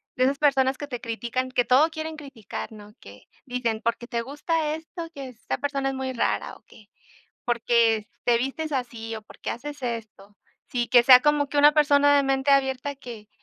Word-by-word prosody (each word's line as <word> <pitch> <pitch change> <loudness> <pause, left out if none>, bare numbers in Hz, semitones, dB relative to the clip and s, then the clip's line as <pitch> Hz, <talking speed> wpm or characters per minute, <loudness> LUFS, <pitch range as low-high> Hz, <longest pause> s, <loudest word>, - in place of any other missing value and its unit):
de 255 - +2
esas 275 +1 +1
personas 270 -2 +2
que 290 - -6
te 250 -4 -5
critican, 240 +2 -3
que 250 -1 +1
todo 265 +7 +4
quieren 315 0 -6
criticar, 270 -10 -8
¿no? 210 -1 -13
Que 100 +1 -15 0.2
dicen, 240 -4 -2
porque 235 +1 -2
te 235 -1 -3
gusta 300 +4 -2
esto, 330 +1 -8
que 275 -2 -7
esta 240 -2 -5
persona 275 -1 -2
es 270 - -4
muy 260 0 -3
rara, 240 - -1
o - - -19
que 215 - -18 0.6
porque 235 -3 +2 0.2
te 240 -1 +3
vistes 270 +6 -3
así 235 -4 -4
o 220 - -9
porque 210 - -8
haces 290 +3 -7
esto. 220 -4 -6 0.3
Sí, 240 -1 -1
que 245 -1 +6
sea 250 +1 +9
como 295 +1 +2
que 290 - -2
una 295 +1 +7
persona 285 -1 +4
de 285 - +4
mente 270 0 +1
abierta 270 0 +1
que 230 -5 -10
260 Hz, 195 wpm, -25 LUFS, 235-285 Hz, 0.6 s, sea